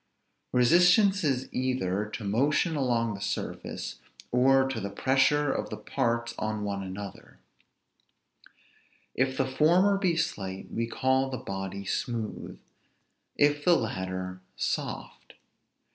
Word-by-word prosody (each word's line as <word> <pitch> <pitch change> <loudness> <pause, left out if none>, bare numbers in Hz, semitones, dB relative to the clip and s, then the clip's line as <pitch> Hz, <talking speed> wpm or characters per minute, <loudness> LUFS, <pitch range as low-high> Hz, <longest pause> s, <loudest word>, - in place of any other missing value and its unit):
Resistance 180 - +5
is 135 -4 0
either 105 -6 -1
to 105 - -5
motion 145 - +1
along 120 -5 +1
the 100 - -8
surface, 100 - -4 0.3
or 135 +2 +4
to 135 - -3
the 100 - -4
pressure 135 +6 +2
of - - -3
the - - -5
parts 120 -3 -1
on 110 -1 -2
one 100 -1 -2
another: 95 +1 -8 1.8
if 130 0 0
the 135 - +2
former 175 +9 +3
be 180 -4 +1
slight, 100 - -3
we 115 0 -1
call 130 +2 +1
the 130 - -3
body 95 -1 -5
smooth; 115 +2 -3 0.8
if 145 0 +3
the 175 +1 +5
latter, 95 - -3
soft. - - -4
125 Hz, 120 wpm, -28 LUFS, 100-145 Hz, 1.8 s, Resistance